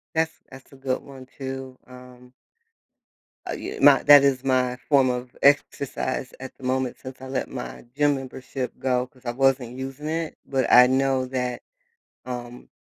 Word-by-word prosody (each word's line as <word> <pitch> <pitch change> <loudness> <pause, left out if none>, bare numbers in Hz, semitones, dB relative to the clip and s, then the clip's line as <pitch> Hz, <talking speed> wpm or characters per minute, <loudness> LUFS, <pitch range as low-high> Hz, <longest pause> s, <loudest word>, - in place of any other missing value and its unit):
That's 160 0 0
that's 135 +1 -14
a - - -14
good 135 -1 -2
one 130 -2 -12
too. 130 -1 -6
Um 125 0 -14 1.2
Uh, - - -2
ye - - -6
my - - +7
that 145 -1 +9
is 135 -2 +2
my 125 -1 +1
form 135 -3 +5
of 125 0 -4
exercise 140 -2 +1
at 130 0 -9
the - - -16
moment 130 0 -1
since 130 0 -10
I 130 - -8
let 130 - -3
my 125 - -7
gym 145 -1 +3
membership 130 -1 -5
go 125 -1 0
'cause 130 0 -25
I 120 - -1
wasn't 130 -1 +1
using 135 +3 -6
it. 165 0 -3
But 135 -3 0
I 125 0 +9
know 130 0 +1
that, 125 -1 -3 0.6
um, 125 -1 -7
130 Hz, 170 wpm, -24 LUFS, 125-135 Hz, 1.2 s, that